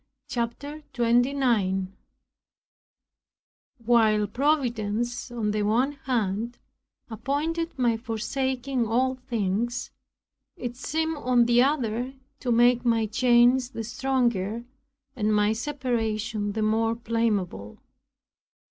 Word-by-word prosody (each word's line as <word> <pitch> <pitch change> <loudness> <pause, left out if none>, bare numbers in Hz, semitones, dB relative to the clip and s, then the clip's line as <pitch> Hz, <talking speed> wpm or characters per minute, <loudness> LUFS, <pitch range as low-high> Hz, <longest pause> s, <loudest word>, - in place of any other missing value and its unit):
CHAPTER 280 +6 -4
29 235 -6 +1 1.9
While 220 -3 +4
providence, 240 -2 -1
on 225 -3 -2
the 210 0 -1
one 230 +7 +2
hand, 235 -4 -2 0.5
appointed 290 +9 -2
my 240 -3 +2
forsaking 250 +2 -2
all 255 +4 +2
things, 240 -2 -2 0.7
it 245 -1 -5
seemed 320 +4 -2
on 250 -3 +3
the 240 +1 +4
other 255 -2 0 0.2
to 250 - -2
make 240 +1 +4
my 230 -2 +2
chains 245 +3 +4
the 225 - -5
stronger, 235 -3 -1 0.5
and 215 -3 +1
my 210 +1 +3
separation 225 -5 -2
the 220 0 -1
more 225 +1 +1
blameable. 215 - -2
235 Hz, 95 wpm, -26 LUFS, 220-255 Hz, 1.9 s, While